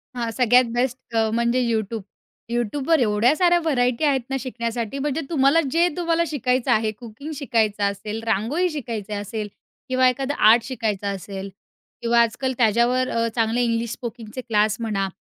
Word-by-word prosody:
हां, 235 Hz, -2 st, -2 dB
सगळ्यात 250 Hz, +2 st, +4 dB
बेस्ट 245 Hz, -1 st, -2 dB, 0.2 s
म्हणजे 235 Hz, +2 st, +1 dB
YouTube. 225 Hz, -2 st, -1 dB, 0.5 s
YouTubeवर 265 Hz, +7 st, +1 dB
एवढ्या 230 Hz, +3 st, +3 dB
साऱ्या 350 Hz, 0 st, +4 dB
व्हरायटी 255 Hz, -5 st, 0 dB
आहेत 275 Hz, -3 st, +2 dB
ना 270 Hz, -, -1 dB
शिकण्यासाठी 235 Hz, 0 st, -4 dB
म्हणजे 295 Hz, +2 st, -1 dB
तुम्हाला 280 Hz, 0 st, +4 dB
जे 335 Hz, +3 st, +3 dB
तुम्हाला 335 Hz, -1 st, +1 dB
शिकायचं 255 Hz, -3 st, 0 dB
आहे 220 Hz, -1 st, +2 dB
कुकिंग 235 Hz, +7 st, -10 dB
शिकायचं 225 Hz, -7 st, 0 dB
असेल, 200 Hz, +2 st, -2 dB
रांगोळी 235 Hz, -, +1 dB
शिकायची 230 Hz, -, -5 dB
असेल 205 Hz, +1 st, -4 dB, 0.4 s
किंवा 255 Hz, 0 st, +4 dB
एखादा 270 Hz, +2 st, -2 dB, 0.2 s
आर्ट 230 Hz, +1 st, +6 dB
शिकायचं 220 Hz, -6 st, -3 dB
असेल 195 Hz, +1 st, -7 dB, 0.5 s
किंवा 235 Hz, 0 st, +3 dB
आजकाल 255 Hz, +3 st, 0 dB
त्याच्यावर 240 Hz, +3 st, +2 dB
अ, 230 Hz, 0 st, 0 dB
चांगले 230 Hz, +1 st, +1 dB
इंग्लिश 230 Hz, -1 st, -1 dB
स्पोकिंगचे 235 Hz, 0 st, -7 dB
क्लास 215 Hz, -3 st, +1 dB
म्हणा 210 Hz, -4 st, -1 dB
235 Hz, 150 wpm, -23 LUFS, 220-265 Hz, 0.5 s, आर्ट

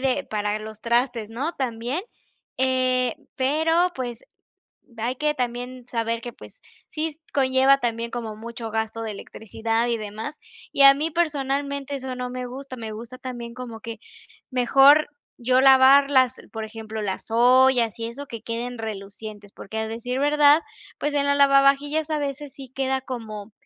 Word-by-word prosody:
de 270 Hz, +1 st, 0 dB
para 210 Hz, 0 st, -2 dB
los 215 Hz, 0 st, -9 dB
trastes, 235 Hz, -2 st, 0 dB
¿no?, 275 Hz, +9 st, -3 dB
también, 245 Hz, +3 st, -2 dB, 0.6 s
eh 255 Hz, -2 st, +1 dB, 0.2 s
pero, 320 Hz, +6 st, +2 dB
pues, 245 Hz, -2 st, -5 dB, 0.7 s
hay 240 Hz, +3 st, -2 dB
que 300 Hz, +2 st, +1 dB
también 250 Hz, 0 st, -4 dB
saber 230 Hz, -1 st, -2 dB
que, 240 Hz, -, -6 dB
pues -, -, -15 dB, 0.3 s
sí, 310 Hz, 0 st, -4 dB
conlleva 265 Hz, 0 st, +4 dB
también 235 Hz, -1 st, -2 dB
como 225 Hz, -3 st, -5 dB
mucho 230 Hz, 0 st, -7 dB
gasto 220 Hz, 0 st, -2 dB
de 220 Hz, -1 st, -3 dB
electricidad 225 Hz, +3 st, -3 dB
y 235 Hz, -, 0 dB
demás. 215 Hz, +7 st, -6 dB, 0.3 s
Y 280 Hz, -, +4 dB
a 275 Hz, 0 st, +10 dB
mí 310 Hz, +3 st, -2 dB
personalmente 280 Hz, -3 st, -1 dB
eso 260 Hz, -1 st, -5 dB
no 250 Hz, 0 st, -4 dB
me 250 Hz, 0 st, -5 dB
gusta, 260 Hz, +1 st, -8 dB
me 220 Hz, -2 st, -6 dB
gusta 235 Hz, +3 st, -9 dB
también 240 Hz, -2 st, -7 dB
como 235 Hz, -3 st, -8 dB
que 230 Hz, -1 st, -7 dB, 0.5 s
mejor 270 Hz, +4 st, +5 dB, 0.3 s
yo 255 Hz, +2 st, +2 dB
lavarlas, 265 Hz, -1 st, +6 dB, 0.2 s
por 220 Hz, -1 st, -4 dB
ejemplo, 220 Hz, 0 st, -6 dB
las 190 Hz, -2 st, -3 dB
ollas 245 Hz, -1 st, +4 dB
y 230 Hz, -, -2 dB
eso, 270 Hz, +5 st, -7 dB
que 230 Hz, -3 st, -7 dB
queden 235 Hz, +2 st, -4 dB
relucientes. 205 Hz, -1 st, -8 dB
Porque, 220 Hz, +3 st, -8 dB
a 220 Hz, -, -2 dB
decir 245 Hz, +3 st, -3 dB
verdad, 295 Hz, +2 st, +5 dB, 0.4 s
pues, 295 Hz, 0 st, -1 dB
en 280 Hz, -, +2 dB
la 285 Hz, 0 st, +3 dB
lavavajillas 280 Hz, +2 st, +4 dB
a 305 Hz, -1 st, 0 dB
veces 285 Hz, 0 st, -5 dB
sí 270 Hz, -3 st, -11 dB
queda 265 Hz, 0 st, 0 dB
como 220 Hz, -5 st, -7 dB
250 Hz, 160 wpm, -24 LUFS, 230-275 Hz, 0.7 s, a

